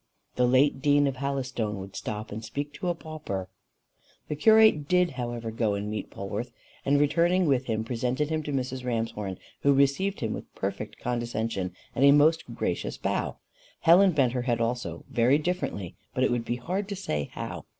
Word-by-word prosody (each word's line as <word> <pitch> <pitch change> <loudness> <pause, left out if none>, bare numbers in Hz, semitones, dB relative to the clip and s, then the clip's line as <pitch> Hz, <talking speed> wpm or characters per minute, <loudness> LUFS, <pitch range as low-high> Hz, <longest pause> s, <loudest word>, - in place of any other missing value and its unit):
The 125 - +3
late 135 +2 +3
dean 145 0 +4
of 135 -2 -1
Halystone 130 -6 -2
would 95 0 -8
stop 110 0 -5
and 110 +2 -5
speak 140 +6 -4
to 180 - -5
a 175 - +1
pauper." 155 - -5 0.8
The 150 - -1
curate 215 -4 +5
did 180 0 +3
however 120 -3 -4
go 110 -2 0
and 105 +1 -3
meet 110 - -4
Polwarth, 100 +4 -5 0.3
and 140 +1 +3
returning 170 +5 +3
with 135 -4 +2
him 110 -1 0
presented 125 +5 -1
him 155 0 0
to 150 - -5
Mrs. 130 -1 -2
Ramshorn, 115 -5 -2 0.2
who 140 - +4
received 140 +9 +2
him 110 -2 -1
with - - -9
perfect - - -4
condescension, 115 -6 -2 0.2
and 130 - +1
a 140 - +8
most 155 +3 +4
gracious - - -2
bow. - - -2 0.4
Helen 180 +3 +6
bent 130 -5 +2
her 125 - 0
head 120 -2 0
also, 120 +1 -2
very 120 +3 +3
differently, 150 - -3 0.2
but 130 - +2
it - - +3
would 120 -1 -1
be 120 - -1
hard 185 +11 -3
to 200 - -3
say 75 - -3
how. - - -6
130 Hz, 185 wpm, -27 LUFS, 115-150 Hz, 0.8 s, a